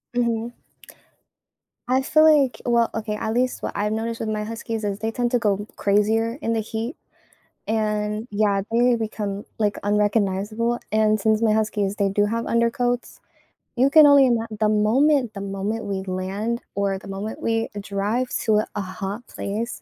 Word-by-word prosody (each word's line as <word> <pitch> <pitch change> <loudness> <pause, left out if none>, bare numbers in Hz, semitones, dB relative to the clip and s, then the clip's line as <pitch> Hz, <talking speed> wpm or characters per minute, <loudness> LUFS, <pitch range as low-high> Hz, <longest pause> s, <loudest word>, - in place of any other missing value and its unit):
Mhm. 235 -1 0 1.4
I 260 +2 +2
feel 310 +3 +4 0.2
like 265 -2 -2
well, 235 -1 +3
okay, 215 -1 -3
at 220 +1 -3
least 250 +1 0
what - - -4
I've 210 +1 0
noticed 225 +1 -3
with 220 - -2
my 215 -1 -2
huskies 225 0 -5
is 200 -1 -2
they 225 +1 -2
tend 240 +1 -1
to 245 - +2
go 205 -2 0
crazier 220 +4 +1
in 230 - 0
the 225 - 0
heat, 225 +5 -4 0.7
and 215 0 -1
yeah, 205 -1 +1
they 240 +1 +4
become, 210 -3 -4
like, 210 -2 +1
unrecognizable, 210 +2 0
and 215 0 +3
since 220 +1 +2
my 220 -2 +3
huskies, 210 -2 0
they 200 -1 +1
do 205 +1 +2
have 230 +2 -2
undercoats, 240 +1 0 0.6
you 260 +3 +4
can 310 +1 +8
only 285 -2 +7
ima 230 -2 +1
the 215 - +3
moment 240 +4 +3
the - - -5
moment 200 +3 -3
we 195 -1 -3
land 195 +6 -2
or 200 -1 0
the 200 - -13
moment 195 +3 -5
we 225 0 0
drive 205 +5 -1 0.2
to 215 -2 +3
a 215 - 0
a 205 - -1
hot 200 +4 -6
place, 220 +4 -4
220 Hz, 175 wpm, -23 LUFS, 205-235 Hz, 1.4 s, can